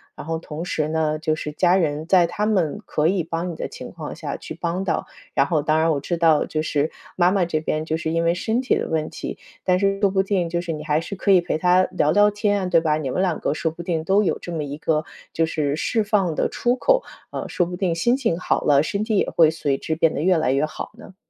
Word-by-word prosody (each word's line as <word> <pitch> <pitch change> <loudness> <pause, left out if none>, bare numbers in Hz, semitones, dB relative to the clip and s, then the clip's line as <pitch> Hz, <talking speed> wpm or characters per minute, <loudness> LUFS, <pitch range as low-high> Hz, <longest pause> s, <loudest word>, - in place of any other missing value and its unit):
然 - - -9
后 165 +1 -2
同 160 0 -7
时 155 -3 -1
呢， 155 -1 0
就 155 0 0
是 150 -1 -5
家 175 +4 +3
人 155 -4 0
在 180 -2 +5
他 205 +5 -2
们 185 -9 +1
可 150 +1 +1
以 185 +1 +1
帮 165 +2 -3
你 - - -7
的 - - -4
情 - - -9
况 - - -7
下 - - -5
去 - - -8
帮 170 +3 -2
到。 175 - -1 0.3
然 135 - +3
后 155 0 +1
当 155 +1 +1
然 165 +1 +3
我 145 - 0
知 175 +5 -2
道， 165 -3 +4
就 155 - -2
是 155 -1 0 0.3
妈 180 0 +4
妈 195 -2 +2
这 160 -2 -1
边 155 0 -1
就 160 - -1
是 160 0 -3
因 165 0 +1
为 170 0 +3
身 220 +7 -1
体 260 - +1
的 - - -2
问 155 -1 -1
题， - - -6 0.3
但 180 -1 +3
是 195 0 +1
说 200 - +4
不 190 0 +1
定 190 -3 0
就 170 +1 -1
是 175 -1 -4
你 155 -1 -5
还 155 0 +1
是 185 +4 -6
可 200 - +1
以 185 -2 +6
陪 170 - -2
她 180 +2 +4
聊 150 -4 +2
聊 205 +4 +5
天 205 0 0
啊， - - -2
对 170 -2 +4
吧？ 155 -2 +1
你 150 -4 -3
们 155 - -1
2 180 -4 0
个 - - 0
说 160 +1 -1
不 165 - -9
定 165 -2 -1
都 195 +4 +3
有 185 - 0
这 175 - -7
么 160 -2 -2
一 145 0 -6
个 155 0 0 0.3
就 165 - +2
是 150 -3 -1
释 220 +8 0
放 200 -5 +1
的 - - +1
出 245 +1 0
口， - - +3 0.3
啊， - - -4
说 175 - 0
不 180 +1 -5
定 180 -2 0
心 240 +9 +2
情 230 -11 -1
好 - - 0
了， 145 -1 +4
身 200 +6 -2
体 215 -1 0
也 - - +1
会 160 -2 +4
随 145 -4 -1
之 160 - -3
变 160 0 +2
得 - - -2
越 180 +1 +3
来 135 -5 +1
越 140 +3 +2
好 155 - -7
呢。 210 -4 -13
165 Hz, 295 characters per minute, -22 LUFS, 155-190 Hz, 0.3 s, 以